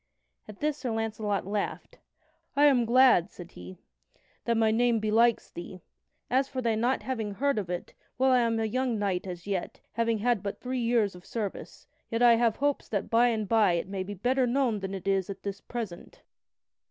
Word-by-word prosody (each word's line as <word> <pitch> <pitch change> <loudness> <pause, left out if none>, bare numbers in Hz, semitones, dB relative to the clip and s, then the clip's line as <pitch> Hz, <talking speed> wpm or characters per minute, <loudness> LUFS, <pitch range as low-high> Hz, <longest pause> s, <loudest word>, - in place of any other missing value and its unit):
At 210 - -12
this 300 0 0
Sir 255 - -3
Launcelot 215 -3 -2
laughed: 205 +1 -4 0.6
"I 290 +1 +5
am 260 -5 +4
glad," 240 -6 +5
said 175 -3 -12
he, 90 +1 -11 0.7
"that 235 -1 +1
my 220 -1 +3
name 235 0 +2
belikes 225 +2 +2
thee. 175 +1 -9 0.4
As 265 +2 +1
for 260 - -5
thy 235 -3 +1
not 240 +4 0
having 220 -6 -3
heard 280 0 +1
of 190 -4 -5
it 180 -1 -5 0.2
well, 260 +1 +3
I 255 - +5
am 230 -1 +1
a 225 - 0
young 250 +1 -1
knight 195 -3 -1
as 175 -1 -7
yet, 195 -3 -3
having 230 0 0
had 235 -1 +1
but 205 +1 -5
three 255 0 -3
years 230 -4 +2
of 180 0 -13
service. 210 -3 -6 0.2
Yet 230 +1 0
I 240 -1 +8
have 230 -2 +2
hopes 285 0 -1
that 200 -3 -3
by 235 +2 +5
and 220 -3 -1
by 215 -4 +4
it 170 +1 -1
may 195 -1 -4
be 200 +2 -5
better 250 +6 +1
known 245 -4 +1
than 195 0 -4
it 190 0 -7
is 195 -1 +1
at 195 - -7
this 200 0 -5
present." 230 - -7
225 Hz, 200 wpm, -28 LUFS, 200-245 Hz, 0.7 s, I